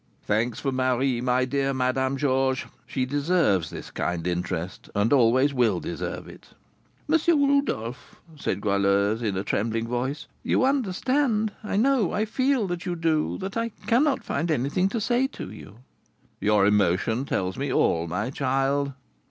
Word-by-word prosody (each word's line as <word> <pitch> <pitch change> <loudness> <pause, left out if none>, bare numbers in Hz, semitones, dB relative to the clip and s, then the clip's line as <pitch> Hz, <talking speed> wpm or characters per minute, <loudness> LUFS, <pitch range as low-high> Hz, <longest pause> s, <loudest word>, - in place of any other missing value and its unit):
"Thanks 110 +3 0
for 135 - -1
Marie, 130 -1 +1
my 125 +1 +2
dear 135 +1 0
Madame 130 +1 0
Georges; 130 -1 +1 0.2
she 130 -2 -1
deserves 145 - +1
this - - -8
kind 90 -1 -2
interest, 90 0 -3
and 100 +6 +2
always 130 +2 +4
will 115 -8 +2
deserve - - -5
it." - - -13 0.6
"M. 325 +2 +4 0.3
Rodolph," 130 - -1 0.2
said 100 -9 -3
Goualeuse, 100 +2 +2
with 105 -5 -1
a 95 - -1
trembling 115 +3 -1
voice, 125 +5 -2 0.2
"you - - +2
understand, 255 -2 +1
I 210 - -3
know, 250 -3 +2
I 210 +1 +1
feel 255 +1 +1
that 175 -2 -4
you 180 -2 -2
do, 165 -2 0
that 190 +1 -5
I 230 0 -1 0.2
cannot 265 +4 +2
find 160 +5 -2
anything 155 +6 +1
to 230 - -2
say 245 +4 +1
to 265 - -8
you." 105 -1 -11 0.6
"Your 105 -1 +3
emotion 105 +5 +2
tells 95 -7 -1
me 140 0 -2
all, 85 -8 +2
my 105 +9 -2
child." 135 +1 0
130 Hz, 155 wpm, -25 LUFS, 110-180 Hz, 0.6 s, always